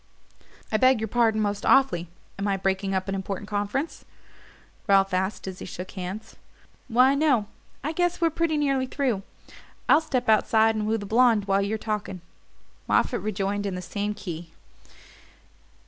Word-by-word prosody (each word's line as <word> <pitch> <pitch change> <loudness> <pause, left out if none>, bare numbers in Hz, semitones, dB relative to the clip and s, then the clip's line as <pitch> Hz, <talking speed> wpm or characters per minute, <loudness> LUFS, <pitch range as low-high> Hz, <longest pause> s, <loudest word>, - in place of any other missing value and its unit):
"I 215 - +3
beg 255 +1 +4
your 220 - -2
pardon 225 -1 +2
most 205 -1 -1
awfully 265 -11 +3 0.3
am 200 - -1
I 195 -1 +1
breaking 195 0 -1
up 190 +1 -1
an 195 - -2
important 195 +1 -4
conference?" 205 +9 -3 0.8
Ralph 195 -1 +4
asked 190 +2 -1
as 185 -1 -6
he - - -7
shook 180 +1 -7
hands. 195 +4 -7 0.5
"Why, 255 +3 +5
no 280 -7 +2 0.4
I 300 - -1
guess 350 +1 0
we're 330 -1 +2
pretty 330 -1 0
nearly 275 -3 +1
through. 255 -7 -1 0.7
I'll 300 - +6
step 265 -6 -2
outside 220 0 +4
and 215 -1 -2
woo 220 +1 +1
the 205 - -6
blonde 225 -1 +3
while 195 0 +2
you're 205 +2 -1
talking," 210 -4 -4 0.7
Moffatt - - +2
rejoined 205 -1 -2
in 190 - -3
the 180 - -4
same 205 +3 -3
key. 170 -5 -7
210 Hz, 160 wpm, -25 LUFS, 195-255 Hz, 0.8 s, I'll